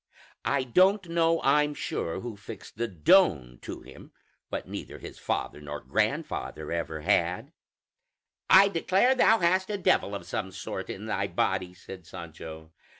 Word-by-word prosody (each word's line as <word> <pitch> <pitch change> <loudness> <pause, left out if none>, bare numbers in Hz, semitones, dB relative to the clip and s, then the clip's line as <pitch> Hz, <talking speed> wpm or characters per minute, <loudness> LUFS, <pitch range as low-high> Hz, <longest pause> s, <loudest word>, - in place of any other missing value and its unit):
I 140 -2 +1
don't 185 - +3
know, 165 0 +2
I'm 150 +1 +3
sure, 85 -7 -3
who 120 -3 -6
fixed 105 0 -11
the 120 - 0
'Don' 80 - +3
to - - -7
him, - - -14 0.4
what - - -4
neither - - -7
his - - -10
father 75 - -3
nor 75 0 -6
grandfather 75 -1 -2
ever 80 -2 -3
had." 90 0 0 1.0
"I 195 +1 +8
declare, 195 +7 +3
thou 225 -3 +5
hast 185 +2 +2
a 205 - -1
devil 105 - +2
of 95 - -7
some 95 +2 -4
sort 90 - -6
in - - -6
thy - - -1
body!" 90 -1 -1
said 90 -2 -11
Sancho. 80 -1 -9
105 Hz, 150 wpm, -28 LUFS, -, 1.0 s, I